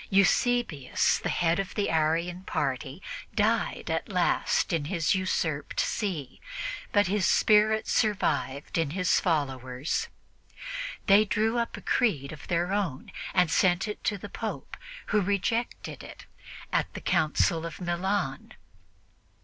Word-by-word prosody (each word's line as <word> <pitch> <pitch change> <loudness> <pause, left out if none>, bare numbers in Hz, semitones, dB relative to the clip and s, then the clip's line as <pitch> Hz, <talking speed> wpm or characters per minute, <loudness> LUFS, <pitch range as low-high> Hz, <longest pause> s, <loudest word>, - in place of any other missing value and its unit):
Eusebius, 200 - +2
the - - -2
head 170 0 +1
of 195 -1 -3
the 205 - +1
Arian 165 +3 +1
party, 140 -1 -3 0.3
died - - +1
at - - -2
last - - +1
in 160 -3 0
his 165 +1 +1
usurped 170 -6 -1
see, 170 - -2 0.5
but 205 0 +4
his 195 +2 0
spirit 215 +3 +4
survived 145 - 0
in 165 -3 +1
his 180 -1 +3
followers. 135 - -1 1.0
They 200 +1 +7
drew 220 +2 +1
up 235 - -2
a - - -9
creed 155 - +1
of 155 -2 -10
their 175 +2 0
own 185 -10 -2 0.2
and 180 -3 +4
sent 180 +3 +3
it 210 - -6
to 205 - +1
the - - -8
Pope, - - -5 0.3
who 210 - +3
rejected 205 +5 -1
it - - -11 0.5
at - - +1
the - - -5
Council 160 +1 +2
of 165 -2 -6
Milan. 175 -4 -2
180 Hz, 135 wpm, -28 LUFS, 155-205 Hz, 1.0 s, They